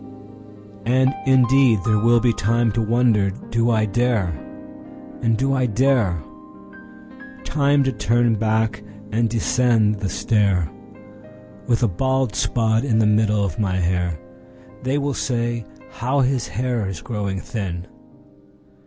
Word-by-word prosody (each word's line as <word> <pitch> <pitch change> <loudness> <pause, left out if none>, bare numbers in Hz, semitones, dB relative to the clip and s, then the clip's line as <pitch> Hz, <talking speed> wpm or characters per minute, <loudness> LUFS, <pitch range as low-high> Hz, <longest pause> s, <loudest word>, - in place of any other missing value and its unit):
And 130 +2 +3
indeed 130 -2 +4
there 110 -2 +2
will 120 +2 +4
be 120 -1 +2
timeTo 115 +1 0
wonder, 115 -4 +2 0.2
"Do 115 +1 +1
I 110 -2 +2
dare?" 110 -2 0 0.9
and, 115 -1 +1
"Do 135 +2 0
I 130 -2 +1
dare?"Time 140 - -2
to 135 - 0
turn 115 +2 +1
back 110 0 0 0.3
and 115 +1 +1
descend 115 -2 +1
the 100 -2 -2
stair, 100 -7 +1 1.0
With 120 0 +1
a - - +4
bald 130 +4 0
spot 110 +1 0
in 120 -6 +1
the 110 - +3
middle 105 -1 +2
of 90 -1 -5
my 95 -4 0
hair—(They 85 - -4
will 145 0 -1
say: 120 -3 -2 0.3
"How 130 +5 -1
his 130 -1 0
hair 115 +3 -2
is 95 -4 -5
growing 100 -4 -3
thin!") 90 -5 -5
115 Hz, 125 wpm, -21 LUFS, 105-125 Hz, 1.0 s, indeed